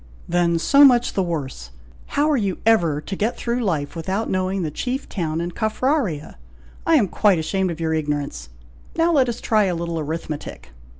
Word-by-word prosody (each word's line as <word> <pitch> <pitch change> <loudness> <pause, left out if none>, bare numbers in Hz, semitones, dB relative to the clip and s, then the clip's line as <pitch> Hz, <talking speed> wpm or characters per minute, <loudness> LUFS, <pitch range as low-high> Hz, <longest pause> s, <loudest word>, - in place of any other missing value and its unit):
"Then 170 -1 +2
so 280 +12 +5
much 245 -3 +5
the 195 - +1
worse! 140 - -4 0.5
how 290 +1 +4
are - - +3
you 200 -7 -1
ever 170 -10 +3
to 195 - -5
get 215 +5 -1
through 240 +1 -1
life 155 -8 -1
without 190 +7 -2
knowing 185 0 -1
the 155 - -3
chief 255 - -3
town 165 -4 -3
in 170 +1 -3
Caffraria! 220 - -1 0.5
I 330 - +5
am 230 -10 +4
quite 200 +1 +3
ashamed 190 +4 -1
of 170 -1 -5
your 160 -1 0
ignorance. 145 - -3 0.5
Now 330 +1 +3
let 265 -6 +3
us 235 - -4
try 215 -2 +2
a 180 -2 0
little 170 -1 -3
arithmetic! 155 - -6
185 Hz, 185 wpm, -22 LUFS, 160-225 Hz, 0.5 s, so